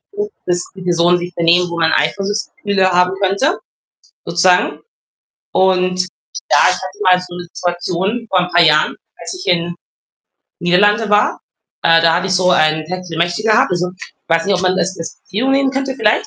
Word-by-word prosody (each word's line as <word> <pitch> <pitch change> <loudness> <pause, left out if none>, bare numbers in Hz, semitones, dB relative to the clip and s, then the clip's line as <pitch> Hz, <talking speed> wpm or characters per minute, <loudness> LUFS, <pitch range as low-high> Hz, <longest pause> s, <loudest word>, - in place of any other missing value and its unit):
zu, 415 0 -3 0.2
dass 175 0 0
die 190 - -11
Personen 175 0 +2
sich 175 +1 -7
benehmen, 175 +1 +3
wo 170 0 -4
man 160 -1 +2
Eifersuchtsgefühle 195 +3 -1
haben 180 +1 +3
könnte, 200 - +1 0.7
sozusagen 180 +1 +2 0.7
und 185 -1 +2 0.5
ja - - +5
ich - - +1
hatte 410 - -8
mal 180 0 +4
so 180 -1 -10
'ne 175 -1 -8
Situation 180 +6 -2
vor 185 - +2
ein 180 0 -1
paar 175 0 +4
Jahren, 155 -2 +3 0.2
als - - -7
ich 370 - -9
in 175 -1 +1 0.9
Niederlande 205 +5 +2
war, 210 0 +2 0.4
äh, 165 0 +5
da 165 -1 +4
hatte 180 +2 0
ich - - 0
so 180 0 +2
ein 155 -2 +2
Techtelmechtel 175 +1 -3
gehabt. 220 -1 +3
Also 180 0 -1
ich - - -12
weiß 165 0 +1
nicht, 200 - +2
ob 180 - -1
man 185 0 +1
das 190 +1 -1
als 165 - -7
Beziehung 225 +8 -2
nehmen 275 0 +2
könnte 270 0 -3
vielleicht. 220 -4 +1
180 Hz, 180 wpm, -16 LUFS, 175-200 Hz, 0.9 s, ja